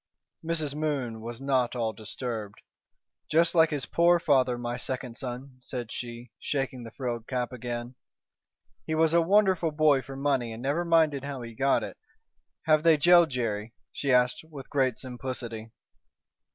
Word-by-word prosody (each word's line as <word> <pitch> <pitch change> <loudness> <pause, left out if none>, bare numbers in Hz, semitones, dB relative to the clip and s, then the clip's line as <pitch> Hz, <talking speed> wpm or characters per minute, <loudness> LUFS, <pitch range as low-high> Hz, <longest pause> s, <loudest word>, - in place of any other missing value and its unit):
Mrs. 160 -3 -1
Moon 140 -7 -2
was 115 +1 -7
not 130 -3 +1
all 115 -2 -1
disturbed. 110 -1 -5 0.7
"Just 165 +2 +3
like 165 -2 +5
his 145 -3 -2
poor 170 +1 +4
father, 130 -6 +2
my 120 0 -3
second 125 -1 -4
son," 125 +1 -7
said 125 -2 -6
she, 120 -1 -7
shaking 135 -3 -2
the 115 - -8
frilled 120 -2 -4
cap 125 -1 -2
again. 120 0 -5 0.9
"He 160 - 0
was 160 0 +3
a 170 - +5
wonderful 190 -2 +3
boy 150 -3 +3
for 135 +1 -9
money 135 -4 0
and 115 +2 -8
never 145 +6 0
minded 160 -5 +3
how 140 -3 -5
he 115 0 -8
got 135 +4 +2
it. - - -7 0.7
Have 155 -1 +4
they 160 -1 +5
jailed 175 +2 +6
Jerry?" 115 -3 -3 0.2
she 140 - -1
asked, 125 +2 +3
with 140 -4 -10
great 130 -4 +1
simplicity. 125 -3 -6
130 Hz, 160 wpm, -28 LUFS, 120-155 Hz, 0.9 s, jailed